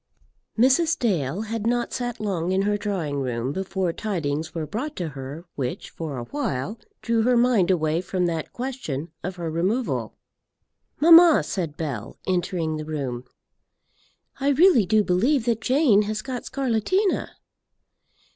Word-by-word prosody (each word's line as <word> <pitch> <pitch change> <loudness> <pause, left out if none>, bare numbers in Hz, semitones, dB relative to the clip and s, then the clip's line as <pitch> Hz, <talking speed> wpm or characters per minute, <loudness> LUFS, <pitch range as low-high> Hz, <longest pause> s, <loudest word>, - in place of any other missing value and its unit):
Mrs. 270 +8 +4
Dale 180 - 0
had 225 0 -3
not 240 0 0
sat 245 -2 -3
long 185 -5 -1
in 190 +1 +2
her 205 +1 +1
drawing 185 -9 -2
room 125 0 -2
before 190 0 -2
tidings 160 -8 -3
were 160 -2 -2
brought 255 - -4
to 175 -3 -3
her 140 +4 -8
which 130 -3 -4
for 155 -5 -5
a 120 - -4
while 215 - -3 0.2
drew 230 -1 +2
her 245 +2 +3
mind 235 -7 +3
away 160 -2 +1
from 185 0 -1
that 165 -2 -2
question 235 - -5
of 185 +1 -4
her 170 -2 -4
removal. 195 +10 -1 0.8
"Mamma," 335 +1 +8
said 165 -6 -4
Bell, 140 -10 -5
entering 175 -3 -1
the 155 - -5
room, 135 -5 -4 1.1
"I 275 +1 +1
really 285 - +5
do 215 +1 +4
believe 225 +8 +2
that 230 -2 0
Jane 255 -6 +4
has 215 +1 -3
got 255 -2 -5
scarlatina." 275 - 0
195 Hz, 145 wpm, -24 LUFS, 160-245 Hz, 1.1 s, Mamma